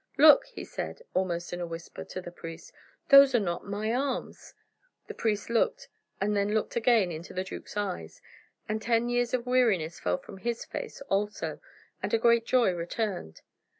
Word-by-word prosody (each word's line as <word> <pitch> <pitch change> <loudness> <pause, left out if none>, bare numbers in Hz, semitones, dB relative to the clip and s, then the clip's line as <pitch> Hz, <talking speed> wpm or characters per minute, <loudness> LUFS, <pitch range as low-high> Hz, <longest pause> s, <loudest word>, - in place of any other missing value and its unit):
"Look," 295 - +8
he - - -8
said, - - -6
almost 175 -2 -1
in 175 - -4
a 175 - -3
whisper, 165 0 -7
to 185 - -7
the 175 - -8
priest, 165 -1 -10 0.4
"those 275 -2 +9
are - - +5
not 175 -3 -3
my 210 +3 -1
arms!..." 265 +1 -3 0.5
The - - -7
priest 215 -2 -1
looked, 235 -1 0 0.3
and 210 +2 0
then 205 +1 +1
looked 220 - -1
again 230 -6 +3
into 165 +3 -8
the 185 - -1
duke's 190 - -8
eyes, 85 - -4 0.5
and 215 +1 -2
ten 230 +1 +1
years 245 0 +1
of 245 -1 -3
weariness 220 -11 +2
fell 90 0 0
from 195 - -12
his 235 +2 -3
face 485 - -6
also, 210 -5 -2 0.4
and - - 0
a - - +4
great 235 0 +3
joy 245 -6 +4
returned. 175 - -4
210 Hz, 180 wpm, -29 LUFS, 180-240 Hz, 0.5 s, those